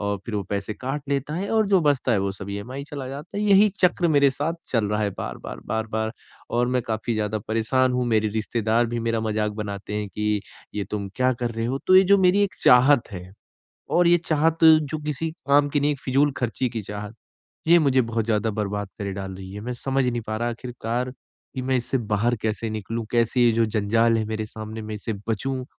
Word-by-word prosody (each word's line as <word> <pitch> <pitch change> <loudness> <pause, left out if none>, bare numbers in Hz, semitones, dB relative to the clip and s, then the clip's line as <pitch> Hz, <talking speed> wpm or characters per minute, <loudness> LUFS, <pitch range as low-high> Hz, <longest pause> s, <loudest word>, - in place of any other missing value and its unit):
और 100 0 -1
फिर 110 - -4
वो 100 - 0
पैसे 100 +1 -2
काट 135 +3 -4
लेता 140 +2 -1
है 195 +4 -3
और 220 -1 +3
जो 190 -3 +4
बचता 140 -5 +2
है 105 - +3
वो 100 0 0
सब 100 +1 -8
ईएमआई 125 +8 -5
चला 140 -3 -6
जाता 145 +8 -8
है, 210 - -1
यही 205 +1 +6
चक्र 175 -1 +3
मेरे 140 -2 +5
साथ 150 +5 -2
चल 115 -4 +1
रहा 105 +1 0
है 100 - 0
बार-बार, - - -6
बार-बार 110 0 -2 0.4
और 120 +1 +1
मैं 125 -1 +1
काफ़ी 110 +1 -2
ज़्यादा 110 0 -1
परेशान 125 +4 +2
हूँ, 125 0 0
मेरे 110 -2 +2
रिश्तेदार 110 +2 0
भी 120 0 -3
मेरा 115 -1 0
मज़ाक 105 -1 -1
बनाते 105 -1 -5
हैं 105 -1 -2
कि 105 0 -1 0.3
ये 100 -1 -2
तुम 100 -2 -3
क्या 130 0 +3
कर 120 -1 -3
रहे 115 0 -3
हो? 130 +3 -1
तो 185 - +7
ये 190 - +9
जो 200 +1 +5
मेरी 190 +2 +4
एक 200 - 0
चाहत 125 0 +5
है। 90 0 -8 0.6
और 175 0 +4
ये 175 0 +6
चाहत 160 +1 +2
जो 155 -1 +5
किसी 150 +2 -2 0.2
काम 145 +1 +5
की 145 0 0
नहीं 145 +1 +2
है - - +2
एक 135 - -14
फिजूल 140 +2 +2
खर्ची 120 +1 -1
की 115 -3 -4
चाहत, 105 +2 -7 0.5
ये 170 +1 +7
मुझे 135 -4 +3
बहुत 115 -2 -2
ज़्यादा 110 -1 +1
बर्बाद 105 -1 -3
करे 100 -1 -3
डाल 95 -1 -6
रही 95 0 -9
है, 105 - -6
मैं 125 +2 -4
समझ 135 +2 -1
नहीं 120 -1 -1
पा 110 - -2
रहा 120 +1 -1
आखिरकार 120 +1 -4 0.4
कि 130 - -2
मैं 130 0 +1
इससे 125 +2 -1 0.2
बाहर 115 +4 +2
कैसे 110 +1 -2
निकलूँ? 110 +1 -4
कैसे 120 +1 +2
ये 120 - +5
जो 115 0 +2
जंजाल 115 +2 +2
है 110 - -1
मेरे 110 0 -3
सामने 110 +1 -7
मैं 110 0 -5
इससे 110 +2 -4 0.2
बचूँ? 130 +4 -2
115 Hz, 230 wpm, -24 LUFS, 105-140 Hz, 0.6 s, ये